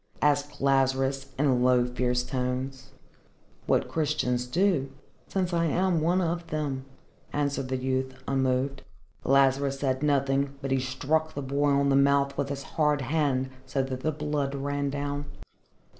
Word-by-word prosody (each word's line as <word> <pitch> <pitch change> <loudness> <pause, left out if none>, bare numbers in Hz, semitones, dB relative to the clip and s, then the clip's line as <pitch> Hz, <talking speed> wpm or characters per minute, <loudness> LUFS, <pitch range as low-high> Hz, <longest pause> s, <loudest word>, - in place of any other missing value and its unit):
asked 145 0 +1
Lazarus 135 0 +1
in 135 -3 +2
low 125 -1 +4
fierce 125 0 0
tones. 130 +1 -3 0.8
"What - - +2
Christians 140 -6 0
do, 170 -2 +1 0.4
since 185 -2 -1
I 170 0 +2
am 175 +1 +1
one 175 +4 +2
of 170 0 -2
them," 140 -4 -3 0.5
answered 140 -2 -1
the 130 0 -1
youth, 130 0 -1
unmoved. 130 0 0 0.4
Lazarus 135 0 +3
said 130 -1 0
nothing, 140 -1 +1
but 135 -1 -4
he 135 - +3
struck 145 +5 -1
the 145 - -3
boy 140 +2 +1
on 140 0 +3
the 135 - +4
mouth 140 0 +3
with 140 -1 -2
his 140 -1 -4
hard 150 0 +1
hand 135 -1 0 0.2
so 135 +1 0
that 130 -1 -4
the 155 +4 0
blood 150 -2 -2
ran 140 0 -1
down. 145 +1 -3
140 Hz, 150 wpm, -27 LUFS, 130-145 Hz, 0.8 s, low